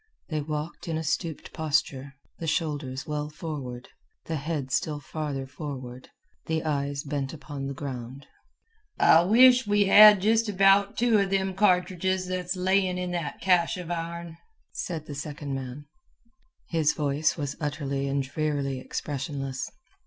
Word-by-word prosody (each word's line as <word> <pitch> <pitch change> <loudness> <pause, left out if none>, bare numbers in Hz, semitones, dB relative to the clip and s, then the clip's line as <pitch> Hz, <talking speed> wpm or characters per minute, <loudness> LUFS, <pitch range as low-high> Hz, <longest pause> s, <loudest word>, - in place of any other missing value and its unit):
They 155 -2 -1
walked 150 +3 -5
in 160 -1 -1
a 160 - -3
stooped 160 +1 -3
posture, 140 -3 -1 0.2
the 165 - -4
shoulders 145 -5 -2
well 150 0 -3
forward, 145 -6 -6 0.4
the 160 - -2
head 145 -2 -3
still 150 +1 0
farther 145 -2 -4
forward, 130 -3 -8 0.4
the 160 -1 -1
eyes 140 -2 -1
bent 140 -2 -3
upon 145 -2 -6
the 140 - -5
ground. 130 -1 -6 0.7
"I 165 - +6
wish 245 +5 +6
we 205 0 +4
had 210 +1 +9
just 220 +3 +2
about 195 +1 +4
two 230 -2 +4
of 195 -1 +1
them 190 -1 0
cartridges 185 -1 +2
that's 180 0 -3
layin' 185 0 +1
in 180 0 -3
that 170 -4 -4
cache 180 -2 +3
of 175 -1 -6
ourn," 170 0 -5 0.3
said 160 -4 -4
the 150 - -7
second 145 0 -5
man. 135 +2 -6 0.8
His 160 -3 +2
voice 150 +2 0
was 145 -3 -3
utterly 140 -2 -2
and 140 0 0
drearily 140 -1 -2
expressionless. 135 -2 -4
155 Hz, 145 wpm, -27 LUFS, 140-180 Hz, 0.8 s, had